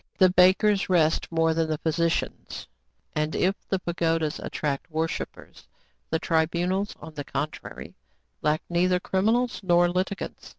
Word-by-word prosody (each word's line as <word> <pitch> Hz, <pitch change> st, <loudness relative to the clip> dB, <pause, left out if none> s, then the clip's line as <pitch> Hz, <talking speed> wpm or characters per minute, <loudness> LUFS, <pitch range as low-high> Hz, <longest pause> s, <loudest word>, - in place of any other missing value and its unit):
The 185 Hz, -2 st, +6 dB
bakers 190 Hz, +3 st, +4 dB
rest 165 Hz, -3 st, +2 dB
more 165 Hz, 0 st, +2 dB
than 160 Hz, 0 st, 0 dB
the 155 Hz, -, 0 dB
physicians; 165 Hz, +2 st, -2 dB, 0.5 s
and, 150 Hz, +1 st, -1 dB
if 190 Hz, +2 st, +2 dB, 0.2 s
the 195 Hz, -, +1 dB
pagodas 165 Hz, -3 st, -1 dB
attract 145 Hz, 0 st, -3 dB
worshippers, 160 Hz, 0 st, -5 dB, 0.4 s
the 160 Hz, -, +1 dB
tribunals, 175 Hz, +5 st, 0 dB
on 160 Hz, +1 st, -10 dB
the 145 Hz, -1 st, -5 dB
contrary, 140 Hz, +2 st, -5 dB, 0.5 s
lack 150 Hz, +1 st, +1 dB
neither 180 Hz, +1 st, +2 dB
criminals 225 Hz, +7 st, +1 dB
nor 175 Hz, -2 st, +4 dB
litigants. 185 Hz, +2 st, -3 dB
170 Hz, 130 wpm, -26 LUFS, 160-185 Hz, 0.5 s, The